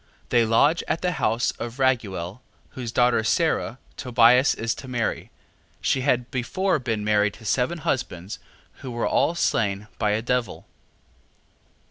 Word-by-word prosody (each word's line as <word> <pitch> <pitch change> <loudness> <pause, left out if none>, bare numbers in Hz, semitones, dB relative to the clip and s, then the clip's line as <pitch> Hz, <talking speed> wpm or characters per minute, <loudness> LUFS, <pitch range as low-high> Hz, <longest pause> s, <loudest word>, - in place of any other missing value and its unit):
They 120 -1 +4
lodge 145 +9 +3
at 165 - -2
the 180 - +1
house 120 -6 0
of 120 +1 -6
Raguel, 110 -8 -1 0.3
whose 120 -3 -6
daughter 120 -2 +3
Sara, 130 -1 0 0.2
Tobias 125 +1 +4
is 115 +1 -1
to 135 - -10
marry; 120 -3 -2 0.5
she 130 - 0
had 125 -2 0
before 170 +9 0
been 115 -5 -2
married 105 -1 +2
to 110 - -15
seven 125 +9 0
husbands, 105 - -3 0.4
who 135 - -8
were 120 -1 -2
all 170 - +2
slain 100 -10 0
by 105 -2 +1
a 110 +2 -1
devil. 125 0 -2
120 Hz, 145 wpm, -24 LUFS, 110-130 Hz, 0.5 s, They